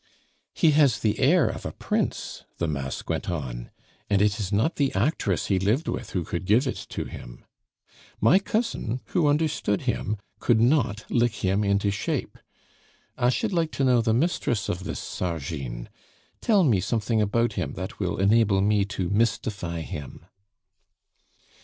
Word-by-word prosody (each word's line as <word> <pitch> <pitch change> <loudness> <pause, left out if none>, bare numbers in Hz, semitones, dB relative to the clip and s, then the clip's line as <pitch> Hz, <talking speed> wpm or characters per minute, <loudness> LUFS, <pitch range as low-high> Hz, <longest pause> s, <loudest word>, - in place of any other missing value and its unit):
"He 160 - +4
has 145 -3 +4
the 105 -2 0
air 145 +1 +4
of - - -4
a - - -4
prince," - - -2
the 85 - -1
mask 70 -3 -4
went - - -2
on, 65 -8 -4 0.4
"and 100 - +3
it 105 +1 +2
is 100 -2 -3
not 110 +11 +1
the 140 -2 +2
actress 100 - 0
he 95 -2 +1
lived 110 - +1
with - - -3
who 90 - -2
could 85 +3 -4
give 110 +8 +4
it 130 - -4
to - - -4
him. - - -10 0.7
My 145 - +5
cousin, 200 - -2
who 170 -5 +2
understood 145 -9 +1
him, 115 -4 -1 0.2
could 115 -2 +3
not 115 -4 +2
lick 120 -3 +1
him 95 +3 +2
into 100 0 +2
shape. 100 - -3 0.8
I 125 -1 +2
should 130 - 0
like 165 -3 +1
to 140 - -1
know 125 -2 +4
the 115 -1 +1
mistress 120 - 0
of 90 +1 -3
this - - -4
Sargine; 70 -8 -4 0.5
tell 210 -5 +4
me 115 - +3
something 110 +3 0
about 115 +3 +1
him - - -3
that - - -6
will - - -1
enable 100 0 +3
me 100 0 +3
to 100 -3 -3
mystify 100 -5 -1
him." 75 0 -8
105 Hz, 165 wpm, -26 LUFS, 95-130 Hz, 0.8 s, My